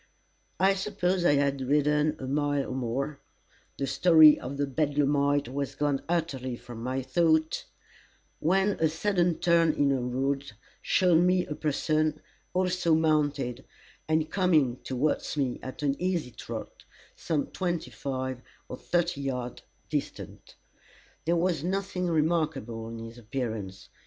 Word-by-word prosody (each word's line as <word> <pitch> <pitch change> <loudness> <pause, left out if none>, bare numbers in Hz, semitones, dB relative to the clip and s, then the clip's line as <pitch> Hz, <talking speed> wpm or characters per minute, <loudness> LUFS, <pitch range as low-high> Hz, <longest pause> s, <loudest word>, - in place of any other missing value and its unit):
I 190 +1 +5
suppose 190 -2 -1
I 145 - +5
had 140 -1 +1
ridden 150 +3 +2
a 130 - -6
mile 145 +1 0
or - - -3
more 130 +3 -3 0.6
the 140 - -1
story 155 +2 +6
of 135 +3 -6
the 145 - +1
bedlamite 145 0 +1
was 140 +2 -4
gone 145 -2 0
utterly 140 -7 -1
from 120 -1 -10
my 130 +2 -2
thought 160 +3 +1 0.7
when 190 +5 +2
a 160 - +3
sudden 175 0 +1
turn 170 -2 +3
in 145 -2 +2
the 135 -1 +1
road 135 +1 -2 0.3
showed 180 -4 +3
me 180 0 +3
a - - -4
person, 155 +1 0 0.3
also 180 -3 +2
mounted, 145 -5 +1 0.4
and 155 0 +1
coming 155 -10 +2
towards 135 +4 -2
me 130 -4 -1
at 130 +3 -7
an 140 -1 +1
easy 180 -8 -1
trot, - - -8 0.3
some 155 -4 -1
twenty 175 -8 -2
five 130 +1 -4 0.3
or 125 - -7
thirty 175 -2 -1
yards 125 -3 -4 0.3
distant. - - -5 0.7
There 170 +2 +2
was 170 -3 0
nothing 190 0 -2
remarkable 155 -8 0
in 115 - -7
his 115 +1 -9
appearance. 110 -5 -5
145 Hz, 135 wpm, -28 LUFS, 130-170 Hz, 0.7 s, story